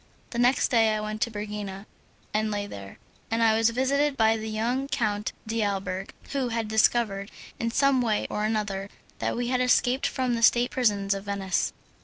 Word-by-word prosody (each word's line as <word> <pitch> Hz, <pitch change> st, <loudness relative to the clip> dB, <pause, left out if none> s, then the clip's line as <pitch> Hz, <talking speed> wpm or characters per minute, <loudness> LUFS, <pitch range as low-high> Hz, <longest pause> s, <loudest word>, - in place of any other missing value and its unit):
The 235 Hz, -, -3 dB
next 245 Hz, +2 st, +3 dB
day 225 Hz, -3 st, +3 dB
I -, -, -1 dB
went 215 Hz, +1 st, -4 dB
to 235 Hz, -, +2 dB
Pergina 205 Hz, -2 st, -6 dB, 0.5 s
and 215 Hz, +1 st, +1 dB
lay 205 Hz, -1 st, -2 dB
there, 100 Hz, -, -9 dB, 0.3 s
and 225 Hz, -, 0 dB
was 225 Hz, 0 st, +4 dB
visited 275 Hz, +4 st, +1 dB
by 220 Hz, -1 st, +4 dB
a 225 Hz, -, +1 dB
young 220 Hz, +5 st, -2 dB
Count 210 Hz, -5 st, -1 dB, 0.2 s
d'Alberg, 195 Hz, -4 st, -2 dB, 0.2 s
who 275 Hz, -3 st, 0 dB
had 225 Hz, -1 st, -2 dB
discovered, 215 Hz, -2 st, +2 dB, 0.3 s
in 230 Hz, -, 0 dB
some 275 Hz, +1 st, +3 dB
way 220 Hz, -3 st, 0 dB
or 210 Hz, -, -3 dB
another, 210 Hz, -2 st, -1 dB, 0.3 s
that -, -, -1 dB
we 240 Hz, 0 st, -1 dB
had 255 Hz, 0 st, +1 dB
escaped 250 Hz, +1 st, +3 dB
from 255 Hz, -2 st, -1 dB
the 230 Hz, -, -1 dB
state 240 Hz, +2 st, +4 dB
prisons 205 Hz, -5 st, +1 dB
of 195 Hz, 0 st, -5 dB
Venice. 195 Hz, -2 st, -1 dB
220 Hz, 180 wpm, -26 LUFS, 205-245 Hz, 0.5 s, was